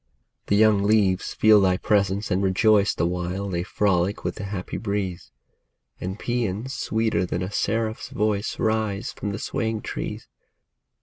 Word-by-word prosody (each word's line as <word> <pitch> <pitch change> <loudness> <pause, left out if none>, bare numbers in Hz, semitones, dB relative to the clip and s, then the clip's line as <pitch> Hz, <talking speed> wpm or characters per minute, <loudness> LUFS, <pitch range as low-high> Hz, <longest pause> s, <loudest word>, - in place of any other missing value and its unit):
The 100 - +2
young 105 -1 +5
leaves 100 -2 +2
feel 110 -1 +6
thy 90 -1 +3
presence 100 0 +1
and 95 - +2
rejoice 100 +2 +3
The 85 - 0
while 90 +3 -2
they 85 -2 -1
frolic 95 0 0
with - - -2
the 100 - -5
happy 95 -2 -5
breeze; 100 -4 -3 0.7
And 95 +2 -4
paeans 120 +1 -2
sweeter 110 -5 0
than 90 0 -2
a 95 - -4
seraph's 110 +2 -1
voice 105 0 -1
Rise 110 -3 -1
from 105 - -4
the 100 - -4
swaying 110 -4 -2
trees. - - -5
100 Hz, 150 wpm, -24 LUFS, 95-110 Hz, 0.7 s, feel